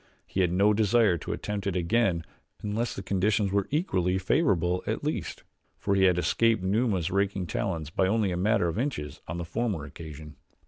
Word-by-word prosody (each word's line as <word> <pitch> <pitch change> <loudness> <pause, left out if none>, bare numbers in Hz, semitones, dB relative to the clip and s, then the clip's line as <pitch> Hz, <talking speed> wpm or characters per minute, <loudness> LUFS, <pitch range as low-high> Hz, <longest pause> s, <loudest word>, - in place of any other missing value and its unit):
He 95 - -1
had 90 -2 +2
no 100 +4 +4
desire 110 -2 +3
to - - -5
attempt 105 -1 -3
it 95 - -1
again 90 -1 +1 0.4
unless 110 +3 -2
the 95 - -6
conditions 100 +1 +1
were 100 -1 +1
equally 95 - +1
favorable 90 - +1
at - - -2
least, - - -3 0.3
for 100 - -1
he 95 -1 +4
had 90 -2 +4
escaped 115 +3 +2
Numa's 95 -3 +1
raking 100 -1 0
talons 80 -1 -3
by 95 - +2
only 105 -1 +1
a - - -1
matter 100 0 +2
of 85 +5 -2
inches 75 - -3
on 80 - -4
the 85 - -4
former 100 -4 -2
occasion. 75 0 -10
95 Hz, 185 wpm, -28 LUFS, 85-105 Hz, 0.4 s, no